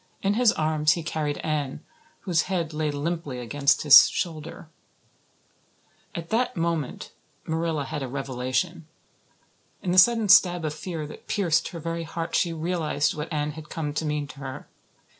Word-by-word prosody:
In 200 +1 +2
his 235 0 +4
arms 155 0 +2
he 170 - -4
carried 155 -2 -2
Anne, 150 -4 -2 0.4
whose 175 -2 0
head 170 -4 -1
lay 155 0 -1
limply 145 -1 -3
against 140 +4 +1
his 145 -2 +9
shoulder. 160 -1 -5 1.5
At 170 -1 -6
that 240 -2 0
moment 165 -5 -2 0.3
Marilla 160 -2 -1
had 145 - -5
a 135 - -3
revelation. 135 +6 -3 1.0
In 180 - -1
the 185 - +6
sudden 230 +2 +5
stab 175 -4 +5
of 150 - -2
fear 160 -1 -5
that 150 - -12
pierced 170 -5 +1
her 170 - -7
very 165 +1 -3
heart 165 +1 -5
she 170 - +2
realized 160 -3 -1
what 150 +2 -6
Anne 150 -1 -1
had 155 0 -11
come 150 -3 -4
to 150 - -2
mean 150 -1 -1
to 140 - -11
her. 135 -1 -7
160 Hz, 160 wpm, -25 LUFS, 150-170 Hz, 1.5 s, his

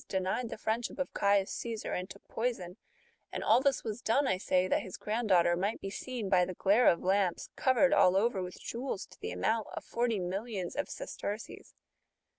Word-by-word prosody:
denied 190 +5 -1
the - - -6
friendship 225 +2 -2
of 275 - -3
Caius 200 -1 +2
Caesar, 230 -2 -4
and 180 +1 -3
took 200 - -13
poison 225 -7 -2
f^ - - -16 0.6
and - - -4
all 230 +4 +5
this 280 0 +1
was 220 +1 -4
done, 265 +5 +2
I 190 - +1
say, 185 -1 +1
that - - +2
his 185 - -8
grand 220 +1 -2
daughter 175 -2 +5
might 200 +5 -1
be 195 - -5
seen, 245 -2 -4
by 185 -2 +4
the 180 0 -3
glare 205 +8 +4
of 170 - +4
lamps, 190 -1 +1
covered 260 +1 +3
all 180 - +5
over 200 0 +2
with 180 0 -6
jewels 235 -4 -4
to - - -19
the - - -4
amount 145 - 0
of - - -5
forty 235 -2 0
millions 190 +1 -3
of 285 - -2
sesterces 220 - -6
205 Hz, 205 wpm, -31 LUFS, 185-235 Hz, 0.6 s, all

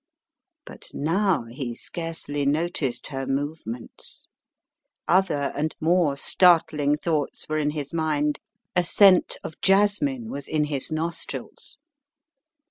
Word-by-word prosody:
But - - -8
now 170 - +1
he 120 0 -5
scarcely 165 -3 -4
noticed 145 -2 0
her 135 0 -3
movements. 135 -4 -4 0.8
Other 170 -6 +2
and 155 +2 -1
more 165 -3 +2
startling 150 -3 +4
thoughts 155 -2 -2
were 155 0 0
in 150 -1 +1
his 150 0 -5
mind. 150 -2 0 0.4
A 180 - +4
scent 185 +1 +5
of 160 - -8
jasmine 210 +6 +2
was 140 0 -6
in 155 -1 +1
his 145 0 -2
nostrils. 165 +2 -4
155 Hz, 115 wpm, -25 LUFS, 145-175 Hz, 0.8 s, scent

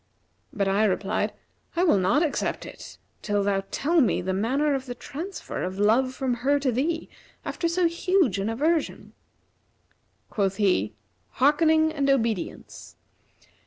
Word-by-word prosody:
But 200 -2 -1
I 195 +2 +2
replied, 200 +1 0 0.4
'I 345 - +2
will 315 - +4
not 215 - +2
accept 310 - -2
it - - -11 0.2
till 205 -2 0
thou 195 -1 +1
tell 325 +3 +2
me 245 - +2
the 185 +1 -2
manner 270 +9 +1
of 265 -1 -3
the 245 - -5
transfer 335 +10 -6
of 185 +1 -4
love 240 +6 +2
from 260 -2 -1
her 285 +3 +2
to 270 -2 +1
thee, 320 +7 -1 0.4
after 340 - -2
so 345 +1 +1
huge 335 - +1
an 200 +3 -1
aversion.' 305 +7 -1 1.2
Quoth 195 -2 0
he, 115 - +1 0.4
'Hearkening 315 +3 +3
and 280 -3 0
obedience! 230 -8 -2
260 Hz, 145 wpm, -25 LUFS, 200-315 Hz, 1.2 s, will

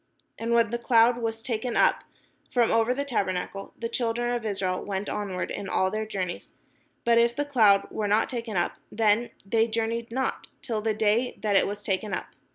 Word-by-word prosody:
And 230 +1 -1
when 230 -2 +3
the 235 - -1
cloud 235 0 +4
was 225 -1 -3
taken 235 0 -2
up - - +3 0.5
from 240 -2 +3
over 225 +1 +3
the 280 +3 -1
tabernacle, 195 -5 -2
the 230 - -3
children 240 0 -1
of 235 -2 -2
Israel 190 -3 -1
went 195 0 -3
onward 195 -3 -3
in 200 -2 -5
all 190 0 +1
their 215 0 -2
journeys: 185 -4 -4 0.5
but 235 0 +5
if 235 0 +3
the 290 - -1
cloud 220 -8 +4
were 215 -1 -2
not 210 +2 +3
taken 230 -5 -4
up, 175 - 0
then 220 +2 +2 0.2
they 225 +3 +2
journeyed 230 +1 -2
not 260 +3 -2 0.2
till 225 -4 -2
the 220 0 0
day 220 +4 +1
that 210 -2 +1
it - - +4
was 205 +1 -5
taken 195 0 -1
up. - - -6
225 Hz, 195 wpm, -27 LUFS, 205-235 Hz, 0.5 s, but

